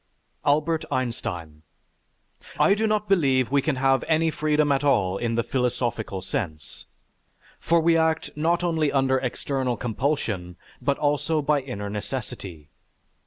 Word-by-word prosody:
ALBERT 155 Hz, +3 st, +2 dB
EINSTEIN 90 Hz, -, -3 dB, 1.0 s
I 200 Hz, -, +5 dB
do 220 Hz, +2 st, +1 dB
not 210 Hz, -1 st, 0 dB
believe 135 Hz, -10 st, +2 dB
we 140 Hz, 0 st, +3 dB
can 150 Hz, 0 st, 0 dB
have 135 Hz, 0 st, +2 dB
any 160 Hz, 0 st, +2 dB
freedom 150 Hz, -1 st, +1 dB
at 135 Hz, 0 st, +1 dB
all 100 Hz, -9 st, +2 dB
in 115 Hz, -1 st, -1 dB
the 115 Hz, -, +1 dB
philosophical 120 Hz, -6 st, -2 dB
sense, 80 Hz, -6 st, -5 dB, 0.7 s
for 170 Hz, 0 st, +2 dB
we 165 Hz, +1 st, +3 dB
act 160 Hz, 0 st, +1 dB
not 170 Hz, +3 st, +1 dB
only 160 Hz, -4 st, +1 dB
under 135 Hz, -1 st, +2 dB
external 130 Hz, -1 st, -2 dB
compulsion, 110 Hz, -, -2 dB, 0.3 s
but 140 Hz, -1 st, +1 dB
also 150 Hz, +2 st, +1 dB
by 150 Hz, 0 st, +2 dB
inner 125 Hz, -6 st, -5 dB
necessity.... 100 Hz, -, -6 dB
135 Hz, 135 wpm, -25 LUFS, 115-155 Hz, 1.0 s, I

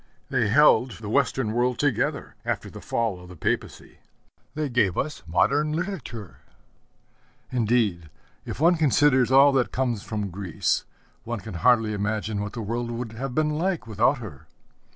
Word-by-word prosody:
They 120 Hz, -5 st, +2 dB
held 125 Hz, 0 st, +5 dB
the 105 Hz, +1 st, -7 dB
Western 130 Hz, -3 st, +1 dB
world 120 Hz, +2 st, +1 dB
together 145 Hz, -6 st, -1 dB
after -, -, -3 dB
the -, -, -10 dB
fall 115 Hz, -6 st, -1 dB
of 90 Hz, 0 st, -13 dB
the 90 Hz, -, -10 dB
Papacy. -, -, -3 dB, 0.6 s
They 155 Hz, -1 st, -1 dB
gave 120 Hz, -8 st, +1 dB
us 155 Hz, +2 st, -2 dB
modern 145 Hz, -, +2 dB
literature: 155 Hz, -, -5 dB, 1.1 s
indeed, 110 Hz, -9 st, +1 dB, 0.3 s
if -, -, -7 dB
one 170 Hz, +3 st, +4 dB
considers 135 Hz, -3 st, +3 dB
all 135 Hz, +2 st, +7 dB
that 135 Hz, -3 st, +1 dB
comes 125 Hz, -5 st, -1 dB
from 105 Hz, -3 st, -4 dB
Greece, 95 Hz, -2 st, -1 dB, 0.4 s
one 120 Hz, -1 st, -4 dB
can 105 Hz, +1 st, -8 dB
hardly 110 Hz, +4 st, +3 dB
imagine 105 Hz, 0 st, -2 dB
what 105 Hz, 0 st, -5 dB
the 115 Hz, -, -5 dB
world 120 Hz, +3 st, -3 dB
would 120 Hz, -1 st, -4 dB
have 125 Hz, +3 st, -5 dB
been 155 Hz, -1 st, +2 dB
like 170 Hz, +1 st, -1 dB
without 115 Hz, +6 st, +2 dB
her. 105 Hz, -, -10 dB
120 Hz, 155 wpm, -25 LUFS, 105-135 Hz, 1.1 s, all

